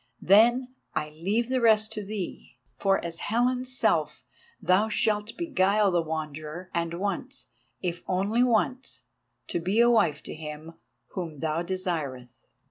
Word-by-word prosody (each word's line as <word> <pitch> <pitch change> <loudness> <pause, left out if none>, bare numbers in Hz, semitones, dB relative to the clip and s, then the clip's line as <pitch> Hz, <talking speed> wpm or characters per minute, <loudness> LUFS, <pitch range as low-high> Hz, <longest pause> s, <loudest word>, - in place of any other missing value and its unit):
Then 240 +6 +5 0.3
I 150 -1 -2
leave 200 +10 -1
the 260 -1 +1
rest 215 -2 +4
to 210 - -4
thee, 195 - -6 0.2
for 195 -1 +3
as 165 -1 -5
Helen's 250 +2 0
self 150 -7 +1 0.3
thou 185 +4 +3
shalt 210 0 0
beguile 205 - +2
the 175 -1 +2
Wanderer, 155 +2 -5
and 170 0 -1
once, 205 +8 -3 0.4
if 175 -1 -2
once 230 +6 +1 0.6
only, - - -9
be 195 +5 +1
a 240 0 +6
wife 175 -11 +2
to - - -6
him 155 +1 -8 0.4
whom 170 -5 -5
thou 160 +1 0
desireth. 165 -9 -3
190 Hz, 135 wpm, -27 LUFS, 165-220 Hz, 0.6 s, a